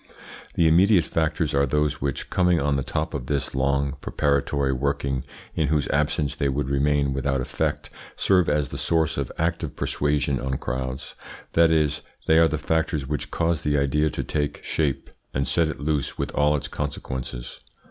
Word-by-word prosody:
The 85 - +4
immediate 90 +3 +5
factors 80 -1 0
are 70 0 +3
those 75 +2 0
which, 70 -2 -3
coming 90 -2 +3
on 70 -1 +1
the 70 - 0
top 75 +4 -2
of 65 -2 -4
this 70 -2 -1
long, 70 +1 0
preparatory 70 -1 +1
working, 70 -1 -1 0.3
in 80 - +1
whose 75 0 +1
absence 75 0 +1
they 70 - 0
would 70 0 -1
remain 70 0 +2
without 70 0 0
effect, 65 - -2 0.2
serve 90 -3 +3
as 75 -2 +1
the - - -6
source 80 -2 +1
of 70 - -3
active 80 -2 -1
persuasion 70 -2 0
on 65 +1 -2
crowds; 65 +2 -4 0.4
that 85 0 +5
is, 75 -2 +2 0.2
they 80 0 +5
are 80 - +6
the 80 - -1
factors 75 -1 0
which 75 +2 -3
cause 85 -1 0
the 75 -2 +1
idea 75 +2 +2
to - - -3
take 75 -1 -2
shape 75 -4 -1 0.2
and 65 0 0
set 85 -1 +2
it 80 - -5
loose 70 -1 -1
with - - -2
all 75 +1 +3
its 70 - -3
consequences. 65 -4 -5
75 Hz, 180 wpm, -24 LUFS, 70-80 Hz, 0.4 s, are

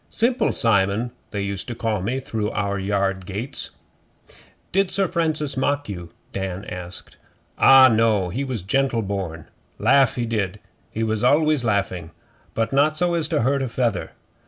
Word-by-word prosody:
'Simple 245 +2 +1
Simon 110 +2 +2 0.2
they 100 -2 -3
used 100 -1 -4
to 120 - -5
call 110 -4 -1
me 120 +8 -1
through 110 -5 -3
our 100 +1 -1
yard 95 -1 -1
gates.' 105 +9 -3 1.0
'Did 195 0 +2
Sir 195 -1 +1
Francis 155 -5 -1
mock 145 +2 0
you?' 90 -4 -6 0.2
Dan 95 0 -4
asked. 90 -1 -8 0.4
'Ah, 135 -1 +8
no. 110 -5 +2
He 130 +10 -3
was 125 -8 -4
gentle 125 +2 +1
born. 95 -6 -4 0.3
Laugh 135 -4 +4
he 120 - -1
did 105 -3 -2 0.3
he 110 - -3
was 110 0 -1
always 150 +1 +3
laughing 100 -7 -1 0.5
but 115 +3 -1
not 150 +3 +3
so 175 +1 +1
as 165 -3 0
to 160 -2 0
hurt 135 +2 +1
a 135 - -1
feather. 115 -5 -1
115 Hz, 160 wpm, -22 LUFS, 100-135 Hz, 1.0 s, Ah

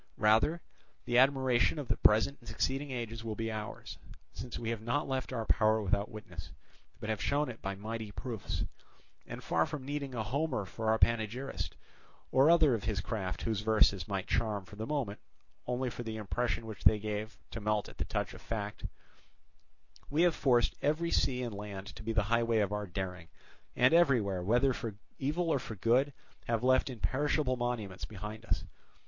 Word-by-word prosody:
Rather, 115 +11 +4 0.4
the 120 - -1
admiration 130 0 +4
of 145 -4 -4
the - - +2
present 110 +6 +4
and 115 - -11
succeeding 135 +5 -1
ages 115 -3 -4
will 110 -2 -3
be 115 +1 -2
ours, 105 -1 -6 0.3
since 120 +4 -6
we 115 -1 -2
have 115 -2 -3
not 120 +7 0
left 130 -1 -2
our 115 -3 -2
power 110 0 +4
without 100 0 0
witness, 90 -7 -9 0.5
but - - -5
have 110 -2 -1
shown 145 0 +1
it 115 - -8
by 100 0 -3
mighty 110 +2 -5
proofs; 115 -1 -4 0.6
and - - -7
far 80 0 +2
from 140 -3 -5
needing 140 -2 -3
a 110 - -1
Homer 130 -1 -1
for 110 +4 -3
our 110 - +4
panegyrist, 115 +4 0 0.6
or 135 +4 +6
other 160 -5 +6
of 115 - -2
his 110 -3 0
craft 95 -7 -3
whose 110 -3 0
verses 105 -5 +3
might 95 -2 -2
charm 105 -4 0
for 105 - -12
the 110 +2 -5
moment 130 -9 -2 0.5
only 125 0 -1
for 110 - -6
the 110 -2 -4
impression 115 +1 -1
which 110 -3 -8
they 110 - +7
gave 105 +1 -4
to 115 - -5
melt 105 0 0
at - - -14
the - - 0
touch - - -2
of - - -11
fact, 105 -2 -4 1.3
we 155 +4 +3
have 175 -2 +5
forced 125 -6 +3
every 155 +4 +1
sea 125 -1 +2
and 120 -3 -3
land 100 -1 -6
to 110 - -9
be 110 +1 -2
the 110 -2 +2
highway 115 +1 +2
of 105 -2 +2
our 105 -1 -2
daring, 90 -1 -4 0.5
and 125 +5 +5
everywhere, 120 - +4
whether 120 +8 +3
for 115 -4 -5 0.2
evil 160 +5 0
or 140 - +2
for 110 - -7
good, 125 +8 +3 0.4
have 115 0 0
left 130 +1 +4
imperishable 130 +3 0
monuments 120 -6 -3
behind 105 +2 -7
us. - - 0
115 Hz, 190 wpm, -32 LUFS, 105-130 Hz, 1.3 s, they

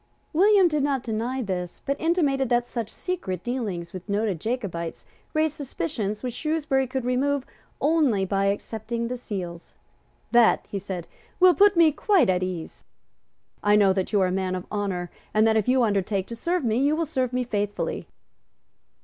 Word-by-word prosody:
William 390 +2 +5
did 300 -3 0
not 275 -3 0
deny 240 +3 -2
this, 180 -4 -4
but 275 - 0
intimated 290 -6 +1
that 240 0 +2
such 230 -4 -4
secret 190 - -4
dealings 205 -9 -3
with 185 +2 -8
noted 200 -3 0
Jacobites 200 -9 -4 0.3
raised 310 -1 +2
suspicions 210 - -4
which 250 -2 -3
Shrewsbury 300 -4 0
could 260 -1 -3
remove 270 +2 +1 0.3
only 280 -10 +2
by 195 +1 0
accepting 220 +3 -2
the 250 - -2
seals. 180 -8 -6 0.6
"That," 235 -1 +5
he 200 - -4
said, 185 -3 -5 0.3
"will 365 -1 +7
put 405 +2 +5
me 330 -2 +6
quite 360 - +3
at 180 0 0
ease. 180 -3 -5 0.8
I 205 0 +4
know 200 -2 +5
that 190 -1 -2
you 210 - +3
are 185 - +3
a - - -2
man 185 0 -1
of 185 - -5
honour, 190 -4 -2 0.2
and 215 +1 +5
that, 220 0 +3
if 215 -2 +1
you 255 0 +4
undertake 200 -2 0
to 235 - -7
serve 340 +7 -1
me, 225 -2 +1
you 285 +4 +3
will 330 +1 0
serve 260 -5 -1
me 250 0 0
faithfully." 205 -3 -2
230 Hz, 175 wpm, -25 LUFS, 195-275 Hz, 0.8 s, will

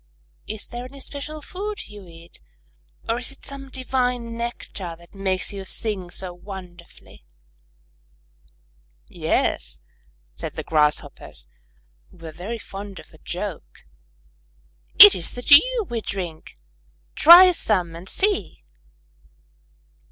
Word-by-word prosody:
Is 215 0 -4
there 240 +1 -8
any 275 +2 -12
special 295 +2 -7
food 410 +4 -6
you 205 -3 -12
eat, 165 0 -13 0.7
or 230 +1 0
is 250 - 0
it 275 - -12
some 275 -1 -8
divine 250 -3 -2
nectar 220 -7 -6
that 170 +1 -19
makes 195 0 -1
you 195 -1 -6
sing 190 -2 -4
so 180 0 -4
wonderfully?" 175 - -12 1.8
"Yes," 70 0 -1 0.5
said - - -6
the - - -6
Grasshoppers, 150 -1 -1 0.6
who - - -21
were 165 -1 -9
very 195 +9 -6
fond 200 -2 -9
of - - -13
a 155 - -18
joke; 185 +1 -7 1.1
"it 205 - +12
is 180 -3 -4
the 245 - -7
dew 455 - +6
we 235 -1 -3
drink! 175 - -6 0.6
Try 355 +3 +9
some 185 - 0
and 175 +3 -8
see." 390 - 0
205 Hz, 120 wpm, -23 LUFS, 175-255 Hz, 1.8 s, it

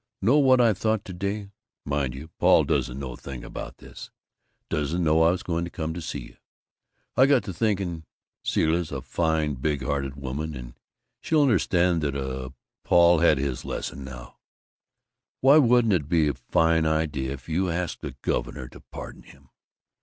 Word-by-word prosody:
Know 125 +10 +4
what 130 -2 +5
I 115 -3 +5
thought 110 +1 -1
to 95 - -7
day? 100 +2 -4 0.3
Mind 70 -3 -1
you, 75 +4 -9
Paul - - +5
doesn't 65 0 -1
know 65 -2 -5
a - - -8
thing 65 -3 -8
about - - -8
this - - -11 0.6
doesn't 75 +4 -1
know 80 0 +3
I 80 - +6
was 90 +1 -1
going 85 -1 -1
to 85 - -4
come 80 -2 -4
see 75 - -5
you. - - -13 0.8
I 130 - +6
got 135 -3 +4
to 95 - -6
thinking: 95 -6 -1 0.4
Zilla's 80 +1 +1
a 70 -2 -5
fine, 80 +1 0
big 70 +1 -2
hearted 70 +1 -2
woman, 70 +3 -4
and - - -8 0.5
she'll 155 -2 +3
understand 90 - +2
that, 70 -2 -1
uh, 65 -1 -4 0.3
Paul's 85 -1 +5
had 80 -3 +5
his 65 -2 -2
lesson 70 - -5
now. 65 -2 -10 1.0
Why 135 +3 +6
wouldn't 120 -5 +4
it 75 -5 0
be 80 -3 +3
a - - -1
fine 80 +6 +2
idea 75 -4 -1
if 65 -2 -11
you 90 +3 0
asked 85 0 -3
the - - -6
governor 65 - -2
to - - -13
pardon - - -10
him? 70 -2 -19
80 Hz, 175 wpm, -25 LUFS, 70-90 Hz, 1.0 s, I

